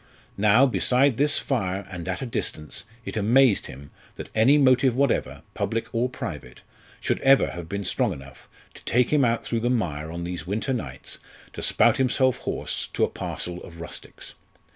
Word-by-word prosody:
Now, 110 +6 +6
beside 130 0 +2
this 145 +1 +2
fire 100 -7 -1
and 90 -2 -6
at 95 +6 -3
a - - -3
distance, 85 -7 -4 0.2
it - - -6
amazed 115 +2 +4
him 70 +2 -11 0.2
that - - -9
any 120 +7 +5
motive 130 -2 +4
whatever, 140 -1 0
public 115 0 -3
or 120 +2 +1
private, 60 - -7 0.4
should - - -1
ever 135 0 +4
have 85 -1 -8
been 100 +1 -3
strong - - +1
enough 70 -1 -11 0.2
to - - -14
take 125 +3 +2
him 145 -2 +4
out 115 -1 +1
through 115 - -1
the 120 +2 0
mire 80 -10 -1
on 85 +1 -5
these 90 0 -5
winter 110 +7 -1
nights 70 - -6 0.3
to - - -6
spout - - +4
himself 130 0 +2
hoarse - - -4
to - - +1
a - - +2
parcel 90 0 -5
of 85 -1 -12
rustics. 85 - -9
115 Hz, 180 wpm, -25 LUFS, 90-130 Hz, 0.4 s, Now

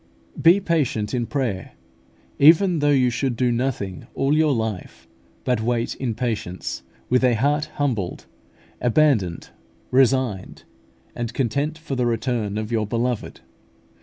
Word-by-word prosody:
Be 170 +4 +6
patient 145 - -1
in 120 -2 -1
prayer, 125 -10 -3 0.7
even 165 +4 +6
though 145 0 +2
you 130 -3 +3
should 125 0 -1
do 125 0 +1
nothing 115 - -3
all 135 +2 +1
your 155 -1 +3
life 110 -6 -4 0.4
but 125 -3 0
wait 120 +1 -1
in 120 -4 -3
patience, 105 -7 -3 0.3
with 125 +1 +2
a 125 -2 +4
heart 145 +6 +1
humbled, 115 -11 -2 0.6
abandoned, 120 - +2 0.4
resigned, 130 -6 +1 0.5
and 120 -2 -5
content 140 +5 -1
for 160 -4 -5
the 125 -1 +1
return 115 -3 -1
of 110 +1 -4
your 110 -3 0
Beloved. 120 +1 -2
125 Hz, 135 wpm, -22 LUFS, 110-140 Hz, 0.7 s, Be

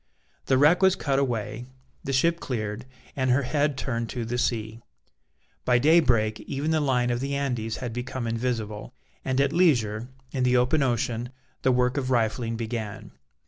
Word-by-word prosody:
The 130 - +4
wreck 150 +7 +5
was 190 0 +5
cut 140 -2 0
away, 120 -2 -2 0.4
the 135 - -3
ship 165 +6 +2
cleared, 110 -1 -4 0.3
and 130 -1 0
her 130 +3 +3
head 145 +1 0
turned 115 -4 -2
to 120 -2 -4
the 120 +2 -2
sea; 115 -2 -2 0.8
by 125 -1 +3
daybreak 125 -7 +3
even 145 +3 -3
the 160 - +2
line 125 -3 +1
of 120 - -1
the 140 +2 -2
Andes 125 -6 -2
had 125 -3 -5
become 125 +1 -4
invisible, 115 - -3 0.3
and 130 0 0
at 140 +1 +2
leisure, 120 - +2 0.2
in 130 - -2
the 125 0 +3
open 125 +5 +2
ocean, 120 -2 -1 0.3
the 130 - +3
work 125 +1 +1
of 130 -2 -1
rifling 115 -1 0
began. 110 -2 -5
125 Hz, 170 wpm, -26 LUFS, 115-135 Hz, 0.8 s, wreck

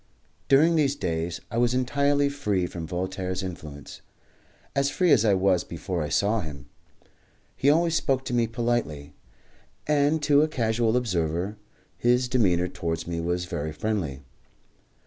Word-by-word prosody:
During 155 +5 +5
these 145 -3 +2
days 85 - -3
I 115 - -1
was 120 0 +2
entirely 140 +3 +2
free 105 -10 -1
from 85 -2 -6
Voltaire's 95 +2 -3
influence, 75 -6 -8 0.7
as 140 0 +2
free 180 +2 +2
as 115 - +5
I 105 -3 +4
was 95 -2 +2
before 85 +1 -4
I 75 - -3
saw 100 +7 +2
him. 70 -5 -8 0.9
He 140 - +2
always 165 +2 +3
spoke 135 -4 0
to - - -4
me 120 -1 +2
politely, 115 - -2 0.7
and 150 +1 +2
to 145 0 +5
a 155 - +3
casual 115 -4 +1
observer 90 -3 -1 0.4
his 125 +1 +3
demeanour 95 -9 +2
towards 85 -2 -4
me 85 -1 -3
was 90 +1 -1
very 80 -3 -4
friendly. 80 -7 -3
110 Hz, 145 wpm, -26 LUFS, 85-135 Hz, 0.9 s, During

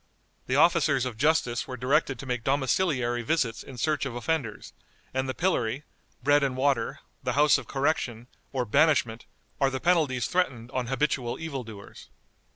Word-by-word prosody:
The 130 - 0
officers 145 -3 +4
of 125 -3 -4
justice 130 -2 +1
were 130 - -6
directed 135 +1 +1
to 135 - -8
make 125 -3 -2
domiciliary 130 -3 +1
visits 125 -2 0
in 130 - -11
search 155 +4 0
of 135 -4 -4
offenders, 120 -4 -3 0.4
and 130 0 -1
the 130 - -3
pillory, 130 -7 0 0.4
bread 145 +2 +4
and 135 -2 -1
water, 130 -4 0 0.2
the 125 -1 -1
House 145 +2 +5
of - - -11
Correction, 135 -5 -1 0.3
or 130 -2 -1
banishment, 120 -3 +2 0.3
are 135 - +3
the 130 -1 -3
penalties 150 -8 +2
threatened 130 -10 -1
on 130 -3 -2
habitual 135 -2 -1
evil 150 -6 -4
doers. 105 -3 -12
130 Hz, 160 wpm, -27 LUFS, 120-145 Hz, 0.4 s, House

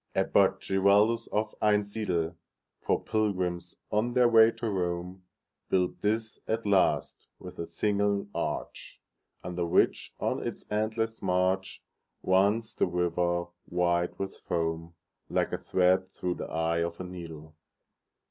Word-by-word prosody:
Abbot - - +3
Giraldus 100 +4 +3
of 105 0 -1
Einsiedel, 100 -5 0 0.4
For - - 0
pilgrims 95 -5 -1
on 115 +3 +1
their 125 -1 +5
way 115 -1 +7
to 115 - -4
Rome, 90 -1 -3 0.4
Built 90 -1 0
this 110 +2 -1
at 115 0 -1
last, 100 -2 +1
with 90 - -11
a 85 - -3
single 100 +2 0
arch, - - -4 0.4
Under 90 0 -3
which, 85 - +2
on - - -1
its - - -5
endless 110 +1 -1
march, 95 0 0 0.4
Runs 100 +4 +2
the - - +1
river, 85 0 0 0.2
white 85 0 0
with 95 0 -5
foam, 80 0 -3 0.3
Like - - 0
a - - -1
thread 95 0 +2
through 90 -1 -2
the - - -6
eye 80 +1 0
of 85 0 -2
a - - -4
needle. 80 -4 -9
95 Hz, 130 wpm, -29 LUFS, 85-105 Hz, 0.4 s, way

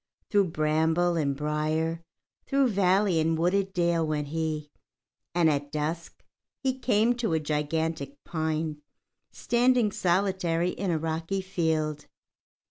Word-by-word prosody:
Through 205 -2 +4
bramble 160 +2 +1
and 140 -4 0
brier, 155 +2 -1 0.5
through 275 -2 +3
valley 190 -3 +3
and 160 +1 +1
wooded 190 +4 +1
dale 170 -2 +1
went 150 -2 -2
he, 155 -1 -3 0.6
and 175 -2 +4
at 145 -1 0
dusk 155 +3 -4 0.3
he 260 -1 -2
came 230 -1 +3
to 230 -8 -1
a 160 - +2
gigantic 160 - -2
pine 155 -2 -2 0.5
standing 245 -2 +2
solitary 180 -2 +1
in 195 - -3
a 165 - +1
rocky 165 +4 -2
field. 160 -5 -1
165 Hz, 125 wpm, -27 LUFS, 155-190 Hz, 0.6 s, Through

